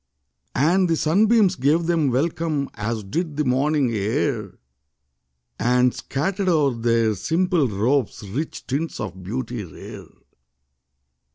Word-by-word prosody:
And 175 +7 +3
the 165 - +3
sunbeams 200 +5 +3
gave 155 +4 +2
them 165 -4 +2
welcome. 150 +2 -1
As 110 0 -3
did 155 - -3
the 150 - +1
morning 135 +1 +2
air 110 0 -1 1.0
And 125 +1 +3
scattered 190 +7 -2
o'er 150 -6 +3
their 115 -1 +1
simple 165 - +1
robes 110 +1 -1
Rich 140 +11 -5
tints 145 +5 -3
of 95 - -6
beauty 115 +3 -4
rare. 80 -6 -10
140 Hz, 115 wpm, -22 LUFS, 115-165 Hz, 1.0 s, And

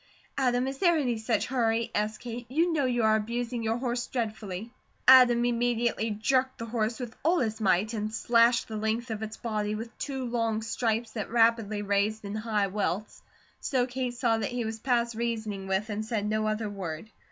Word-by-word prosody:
"Adam, 250 -2 +1
is 270 0 -5
there 345 -3 +4
any 250 -6 0
such 225 +1 0
hurry?" 230 -3 0
asked 210 +1 -1
Kate. 240 0 -7
"You 330 +6 +2
know 290 -4 +1
you 240 -2 +1
are 220 0 +5
abusing 235 +2 -2
your 225 +1 0
horse 245 -1 -2
dreadfully." 215 -3 -4 0.4
Adam 245 -2 +8
immediately 235 -1 +1
jerked 260 +5 +1
the 230 - -5
horse 225 0 -1
with 240 -3 -6
all 335 +4 +3
his 220 -4 -1
might, 200 +2 +2
and 215 -1 -2
slashed 235 +2 +3
the 220 - -5
length 220 +3 -1
of 220 -1 -4
its 220 0 -5
body 215 -2 -2
with 230 +2 -7
two 265 -2 -3
long 230 -2 -1
stripes 225 0 -1
that 215 -2 -4
rapidly 225 -3 +2
raised 205 +2 0
in 200 - -5
high 215 -1 0
welts, 200 +1 -3 0.4
so 255 -3 +1
Kate 250 -1 -3
saw 235 -2 +1
that - - -1
he 245 -1 -2
was 220 0 -4
past 235 -1 +1
reasoning 220 -4 -3
with 190 +2 0
and 210 +1 -2
said 220 -2 -2
no 215 0 0
other 215 0 -1
word. 195 0 -6
225 Hz, 195 wpm, -28 LUFS, 215-245 Hz, 0.4 s, Adam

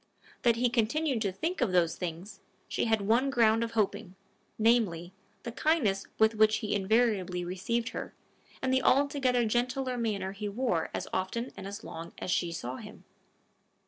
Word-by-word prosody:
That 235 -2 +4
he 245 +2 +2
continued 245 +3 0
to 200 -3 0
think 325 - -3
of 235 -7 +2
those 170 -2 +3
things, 180 +3 -6 0.3
she - - -1
had 220 -2 +2
one 230 +7 +2
ground 230 -3 +3
of 230 - -4
hoping, 205 -3 -1 0.4
namely, 210 -7 +2 0.3
the 235 - -5
kindness 235 -9 +1
with 220 +1 +4
which 215 0 +4
he 215 -3 -2
invariably 200 -3 +1
received 230 +7 -2
her, - - -6 0.5
and 260 0 +1
the 260 - +3
altogether 265 -3 +3
gentler 250 +2 -1
manner 200 -5 -1
he 205 +1 -5
wore 205 -6 -1
as - - -4
often 190 +7 -2
and 195 - -7
as 200 +2 -7
long 165 +1 -8
as 185 - -4
she 175 -1 +1
saw 130 -6 -5
him. - - -11
220 Hz, 170 wpm, -30 LUFS, 190-245 Hz, 0.5 s, That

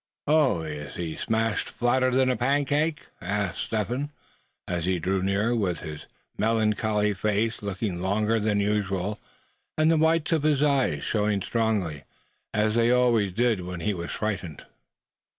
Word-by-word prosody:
"Oh! 145 - +3
is 75 -2 -6
he 85 -2 -4
smashed 110 -1 -1
flatter'n 130 +1 +2
a - - 0
pancake?" 145 +3 +1 0.2
asked 100 0 -2
Step 110 -2 -2
Hen, 135 +4 -2 0.6
as 85 -2 -2
he 95 0 +1
drew 95 +3 0
near, 100 +5 +1
with 95 -6 -1
his 75 -2 -8 0.3
melancholy 105 -1 +1
face 105 +4 -1
looking 100 -2 -3
longer 105 +4 +1
than 105 -1 +1
usual; 100 -1 -1 0.6
and 155 +1 +4
the 165 - +3
whites 160 +1 +2
of 160 -2 +2
his 150 -1 +2
eyes 140 -3 +1
showing 105 -3 0
strongly, 105 -10 -1 0.5
as 105 0 +1
they 115 +1 +3
always 120 -5 +3
did 115 0 +1
when 90 -1 -6
he 105 +4 0
was 85 -2 -5
frightened. 95 -8 -4
105 Hz, 150 wpm, -26 LUFS, 95-125 Hz, 0.6 s, and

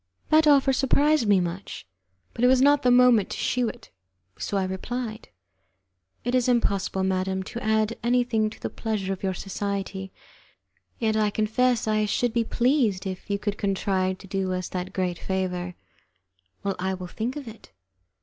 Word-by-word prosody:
That 310 0 +5
offer 275 -2 +5
surprised 280 0 +3
me 200 -2 +5
much, 175 +2 -5 0.5
but 235 - -3
it - - +7
was 260 0 +5
not 285 +2 +5
the 250 - +3
moment 245 -4 +5
to - - -5
shew 245 -2 0
it, - - -12 0.4
so 200 - -3
I 195 - +1
replied: 220 +4 -4 0.9
"It 245 - -2
is 255 -1 +2
impossible, 200 -5 +1
madam, 190 0 0
to 235 +5 -7
add 220 +1 +1
anything 240 -3 +1
to 215 - -13
the - - -4
pleasure 205 -4 -2
of 190 - -8
your 190 -1 -1
society, 195 0 -4 0.9
yet 220 -2 0
I 215 -1 +2
confess 225 +3 +1
I 215 0 +2
should 230 +3 0
be 235 -1 +2
pleased 235 -6 +1
if 190 +1 -6
you 200 - +1
could 205 0 -3
contrive 190 -2 0
to 195 - -13
do 190 -1 -1
us 185 -1 -3
that 180 0 -4
great 180 -2 -2
favour." 180 -2 -3 0.9
"Well, 200 -1 -1
I 190 +1 -1
will 185 -1 -7
think 225 +8 -4
of 290 -4 -7
it." 225 -1 -12
210 Hz, 175 wpm, -25 LUFS, 190-245 Hz, 0.9 s, it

